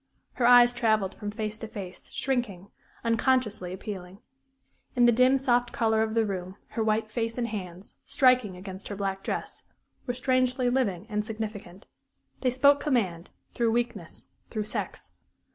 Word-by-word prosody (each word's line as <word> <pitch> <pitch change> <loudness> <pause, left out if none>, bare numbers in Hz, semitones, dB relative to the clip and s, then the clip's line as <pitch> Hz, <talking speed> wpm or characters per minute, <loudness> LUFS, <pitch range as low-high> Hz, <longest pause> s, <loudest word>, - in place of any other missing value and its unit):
Her 240 - +2
eyes 245 0 +8
travelled 220 -5 +1
from 210 - -6
face 215 0 -4
to 225 - -6
face, 190 -4 -8
shrinking 225 -8 -2 0.3
unconsciously 230 -5 +1
appealing. 190 -1 -7 0.8
In 245 -1 +5
the 240 - +7
dim, 255 +3 +5
soft 245 -2 +1
color 220 -1 +2
of 220 0 -1
the 225 -1 +3
room, 185 -2 -4
her 225 - -2
white 215 0 0
face 230 +1 -2
and 240 -1 0
hands, 185 -3 -7
striking 250 -8 +3
against 190 +1 -8
her 205 - -5
black 195 -1 -2
dress, - - -4 0.5
were 245 - -1
strangely 255 -1 +1
living 210 -8 0
and 210 -2 -1
significant. 210 -4 -6 0.5
They 255 - +1
spoke 280 +3 +5
command 195 - -1 0.2
through 230 -2 +1
weakness, 235 -8 -3 0.2
through 215 -2 -2
sex. 210 - -5
220 Hz, 155 wpm, -27 LUFS, 200-245 Hz, 0.8 s, eyes